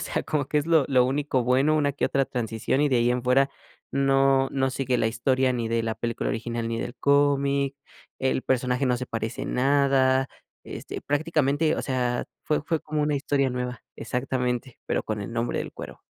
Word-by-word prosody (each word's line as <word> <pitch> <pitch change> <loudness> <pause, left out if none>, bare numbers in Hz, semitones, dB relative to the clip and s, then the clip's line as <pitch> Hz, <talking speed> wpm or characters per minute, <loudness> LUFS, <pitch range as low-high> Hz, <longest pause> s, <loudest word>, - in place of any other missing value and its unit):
sea, 165 - -2
como 145 -3 -1
que 150 - +1
es 145 - -2
lo 160 -4 +4
lo 130 -2 +4
único 135 0 0
bueno, 135 +5 +3
una 145 -2 +1
que 140 - -2
otra 135 0 +1
transición, 115 0 -2
y 150 - +3
de 130 - +2
ahí 120 +1 +3
en 125 0 0
fuera, 135 +2 +3 0.4
no 135 0 +3
no 135 -1 0
sigue 130 -1 -1
la 110 - +2
historia 130 +3 +1
ni 120 -2 -2
de 115 0 0
la 115 0 -2
película 115 0 -3
original, 115 0 -3
ni 115 0 -2
del 120 - -5
cómic, 140 -1 +2 0.4
el 130 0 0
personaje 125 +1 0
no 125 -1 +2
se 130 0 -5
parece 115 +3 -4
en 140 - -3
nada, 135 0 +3 0.4
este - - -7
prácticamente, 155 0 +1
o - - -2
sea, 125 -2 -1 0.2
fue 150 -1 0
fue 160 -1 -1
como 155 -1 -2
una 150 0 +1
historia 140 -1 +1
nueva, 125 0 -4
exactamente, 125 -1 -3
pero - - 0
con 110 -1 -3
el 100 +3 -6
nombre 120 0 -1
del - - -4
cuervo. - - -9
130 Hz, 200 wpm, -25 LUFS, 125-140 Hz, 0.4 s, lo